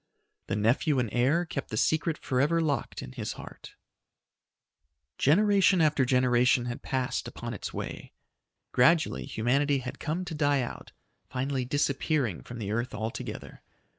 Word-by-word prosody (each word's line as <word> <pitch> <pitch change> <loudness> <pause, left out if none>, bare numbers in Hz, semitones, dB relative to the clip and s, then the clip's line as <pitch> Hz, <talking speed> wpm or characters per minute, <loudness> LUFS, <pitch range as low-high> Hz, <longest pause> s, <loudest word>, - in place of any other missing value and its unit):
The - - -1
nephew 120 +7 +2
and 120 -3 +1
heir 140 +9 +2
kept 135 -5 -5
the 110 - -4
secret 160 +5 +1
forever 145 +6 +1
locked 150 -4 -1
in 130 - -8
his 120 -5 -4
heart. - - -11 1.4
Generation 195 +4 +4
after 150 -4 +3
generation 125 -1 +3
had 120 -1 -5
passed 130 -2 -2
upon - - -6
its - - -5
way. - - -6 0.6
Gradually 155 +6 +3
humanity 140 +5 +1
had 125 -1 -6
come 165 +4 -2
to 175 - -6
die 145 -3 +2
out, 120 - -8 0.4
finally 130 0 -2
disappearing 140 - 0
from 120 - -9
the 105 -3 -4
earth 120 +3 -2
altogether. 110 +2 -6
135 Hz, 140 wpm, -28 LUFS, 120-155 Hz, 1.4 s, Generation